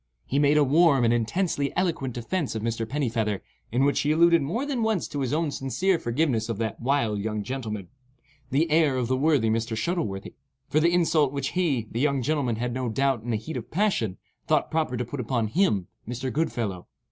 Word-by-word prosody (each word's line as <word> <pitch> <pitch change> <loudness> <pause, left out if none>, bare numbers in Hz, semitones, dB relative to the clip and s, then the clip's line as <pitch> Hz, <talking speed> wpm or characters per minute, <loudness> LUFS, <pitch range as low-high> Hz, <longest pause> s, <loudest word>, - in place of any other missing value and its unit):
He 140 - 0
made 145 +1 +4
a 150 - +6
warm 145 -1 +4
and 115 - +3
intensely 140 - 0
eloquent 155 -9 -1
defence 135 +4 -2
of 110 - -3
Mr. 115 -1 -2
Pennifeather, 115 -8 -1 0.3
in 125 +4 +2
which 140 - +2
he 145 - +1
alluded 170 +1 +5
more 185 - -2
than 275 -5 -2
once 220 -5 0
to 145 - -5
his 130 -3 -1
own 155 0 0
sincere 170 +8 0
forgiveness 120 -4 0
of 115 - -2
that 110 -1 -3
wild 120 -5 +1
young 105 0 -2
gentleman—"the 130 - -5
heir 155 -4 +3
of 125 -2 0
the 130 - +1
worthy 135 -5 +2
Mr. 115 0 -1
Shuttleworthy,"—for 135 - -3
the 170 +2 +3
insult 160 -5 +3
which 140 0 -2
he 150 -11 0
(the 115 - -3
young 140 -2 +1
gentleman) 140 -4 0
had, 120 +2 -2
no 130 -1 -2
doubt 135 +1 +1
in 120 - -7
the 115 - +1
heat 115 +9 -6
of - - -7
passion, 170 - 0 0.3
thought - - +1
proper 155 -6 0
to 125 - -2
put 140 +4 -6
upon 120 -1 0
him 110 - +2 0.2
(Mr. 125 +1 -3
Goodfellow). 115 - -2
135 Hz, 200 wpm, -26 LUFS, 115-155 Hz, 0.3 s, a